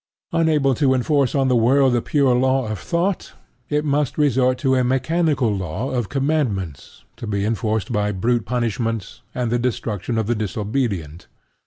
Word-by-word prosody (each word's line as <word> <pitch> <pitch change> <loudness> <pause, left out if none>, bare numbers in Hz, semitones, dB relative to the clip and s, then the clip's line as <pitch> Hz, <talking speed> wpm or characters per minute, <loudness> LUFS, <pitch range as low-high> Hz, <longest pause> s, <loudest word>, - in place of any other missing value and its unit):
Unable 155 -5 +2
to 130 0 +2
enforce 135 +1 +1
on 135 -1 +2
the 130 - +3
world 130 +3 +4
the 120 - +2
pure 140 -2 +2
law 130 0 +2
of 110 -3 -4
thought, 175 - -2 0.4
it 150 +1 0
must 145 -2 0
resort 130 -3 +2
to 130 +1 +1
a 130 -1 +3
mechanical 135 -2 +1
law 95 +6 -3
of 120 -5 -2
commandments 135 - -2
to 115 - -7
be 100 -1 -1
enforced 110 +1 -1
by 105 -2 0
brute 115 +4 0
punishments 115 -3 -2
and 125 -2 -1
the 120 - +1
destruction 115 -2 -2
of 110 - 0
the 120 - +1
disobedient. 105 - -3
125 Hz, 165 wpm, -21 LUFS, 110-135 Hz, 0.4 s, world